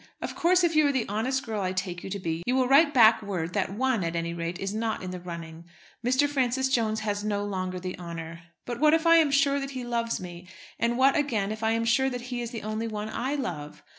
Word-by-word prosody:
Of - - -5
course, 360 +2 +3
if 335 -2 +2
you 305 -1 +5
are - - +2
the 260 -4 -1
honest 250 +6 -1
girl 220 -3 -3
I 185 -1 -1
take 180 -1 -4
you - - -6
to 200 - -3
be, 165 -3 -3
you 250 - +2
will 260 -1 +2
write 285 +3 +6
back 225 -5 +6
word 180 -5 -3
that 200 -2 0
one, 255 -4 +1
at 165 0 -2
any 170 0 -2
rate, 170 +1 -4
is 195 +1 -4
not 220 -2 -2
in 185 - -5
the 180 - -6
running. 170 -2 -8 0.4
Mr. 260 +4 +3
Francis 265 -2 0
Jones 220 -4 +1
has 205 -1 -2
no 205 -1 -1
longer 185 -2 -3
the 185 0 -5
honour. 165 -1 -7 0.2
But 240 -1 -5
what 305 +2 +5
if 325 +1 -1
I 335 0 +7
am 320 -3 +4
sure 280 0 +3
that 275 0 -4
he 250 - -4
loves 235 -1 -1
me; 175 -1 -9 0.3
and 235 +1 +1
what, 270 +1 +4
again, 220 -9 0
if 215 +1 -6
I 220 0 +2
am 230 0 0
sure 265 +3 +3
that 245 -1 -5
he 240 - -2
is 235 - -4
the 230 -2 -7
only 215 +2 -3
one 215 -1 -4
I 260 +6 -2
love? 160 - -5
220 Hz, 260 wpm, -27 LUFS, 185-265 Hz, 0.4 s, I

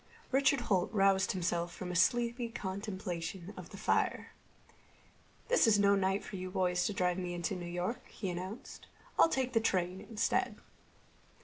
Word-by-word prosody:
Richard 275 0 +3
Holt 190 -6 +1
roused 195 -2 +3
himself 175 -1 -1
from 180 -1 -5
a - - -4
sleepy 235 +4 +2
contemplation 190 -3 -5
of - - -9
the - - -10
fire. - - 0 1.2
"This - - +4
is 215 -2 +6
no 200 0 +5
night 195 0 +1
for 195 - -7
you 185 0 -5
boys 180 -1 +1
to 210 - -2
drive 180 -1 +1
me 175 -1 -3
into 175 +3 -2
New 175 -1 -5
York," 175 +7 -3
he 190 -4 -4
announced. 185 +6 -7 0.3
"I'll - - +7
take 260 -4 -1
the 225 - +4
train 185 -3 0
instead." 225 -1 0
190 Hz, 165 wpm, -33 LUFS, 180-220 Hz, 1.2 s, I'll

